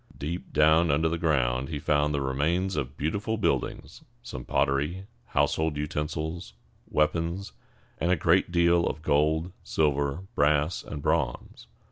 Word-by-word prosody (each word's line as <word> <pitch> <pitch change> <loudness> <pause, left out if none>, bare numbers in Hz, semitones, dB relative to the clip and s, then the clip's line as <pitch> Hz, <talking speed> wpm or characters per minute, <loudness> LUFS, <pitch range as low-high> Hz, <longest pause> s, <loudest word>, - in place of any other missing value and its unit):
Deep 85 +5 -5
down 80 +2 +4
under 75 +3 +2
the 80 - 0
ground 65 -5 +1
he 80 - -3
found 75 0 +1
the 70 -1 -1
remains 80 +8 0
of 70 +2 -3
beautiful 100 +9 -1
buildings, 105 - -2 0.2
some 65 - -7
pottery, 70 +9 0 0.2
household 80 -1 +1
utensils, 75 0 -3 0.4
weapons, 80 +5 0 0.5
and 85 - 0
a - - +5
great 85 +3 +2
deal 85 0 +3
of 80 - -4
gold, 80 +4 +1
silver, 70 +2 0
brass, 75 0 +2
and 70 - -7
bronze. - - -2
75 Hz, 135 wpm, -27 LUFS, 70-85 Hz, 0.5 s, a